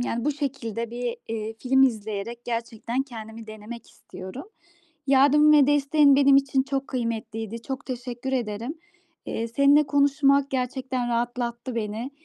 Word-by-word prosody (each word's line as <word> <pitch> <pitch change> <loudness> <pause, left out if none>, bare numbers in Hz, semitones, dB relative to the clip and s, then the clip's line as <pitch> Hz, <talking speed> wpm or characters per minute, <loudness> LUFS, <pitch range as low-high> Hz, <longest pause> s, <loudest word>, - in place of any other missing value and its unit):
yani, 235 0 -2
bu 295 - +1
şekilde 240 -6 -4
bir, 240 0 -3
eee, 220 0 -4
film 265 +1 +3
izleyerek 220 -1 -1
gerçekten 235 +1 -3
kendimi 225 -3 -10
denemek 215 +2 -10
istiyorum. 190 - -10 0.6
Yardım 285 +3 +5
ve 290 -3 +6
desteğin 290 0 +4
benim 275 -1 +6
için 270 -1 +2
çok 275 0 -3
kıymetliydi. 230 -2 -4
Çok 265 +2 -6
teşekkür 250 0 -5
ederim. 235 +3 -2 0.5
Eee, 230 +1 -3
seninle 280 +4 +4
konuşmak 280 0 +3
gerçekten 255 -1 -2
rahatlattı 240 0 -2
beni. 225 +3 -3
245 Hz, 130 wpm, -25 LUFS, 230-275 Hz, 0.6 s, ve